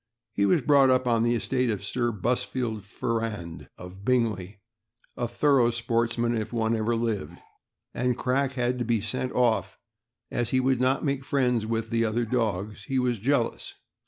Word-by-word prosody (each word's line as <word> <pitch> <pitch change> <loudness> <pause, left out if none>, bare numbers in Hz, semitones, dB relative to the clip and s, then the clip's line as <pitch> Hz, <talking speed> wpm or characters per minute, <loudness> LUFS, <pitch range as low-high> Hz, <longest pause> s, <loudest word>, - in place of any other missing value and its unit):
He 100 0 +1
was 95 - +3
brought 140 -2 +5
up 130 0 +3
on 115 -2 +2
the 120 +1 +2
estate 125 +1 0
of 100 -3 -2
Sir 120 +2 0
Busfield 115 +1 -2
Ferrand, 110 -6 -4
of 90 +2 -11
Bingley 105 -5 0 0.3
— 120 +3 -40
a 120 - -2
thorough 125 0 +3
spoitsman, 115 0 0
if 110 -2 -2
ever 120 - -5
one 115 +1 0
lived 95 -8 -3 0.3
— - - -59
and 125 0 0
Crack 135 +1 0
had 125 -1 -1
to - - 0
be 115 -1 +1
sent 125 +5 -3
off, 120 -3 +1 0.5
as 120 -2 -1
he 130 - +2
would 130 -1 +1
not 130 +4 +2
make 140 -1 -1
friends 125 -5 +1
with 115 0 -2
the 115 0 +2
other 115 +2 0
dogs; 105 -4 -2
he 135 -2 -1
was 125 -3 +1
jealous. 125 +1 -1
120 Hz, 180 wpm, -26 LUFS, 110-125 Hz, 0.5 s, brought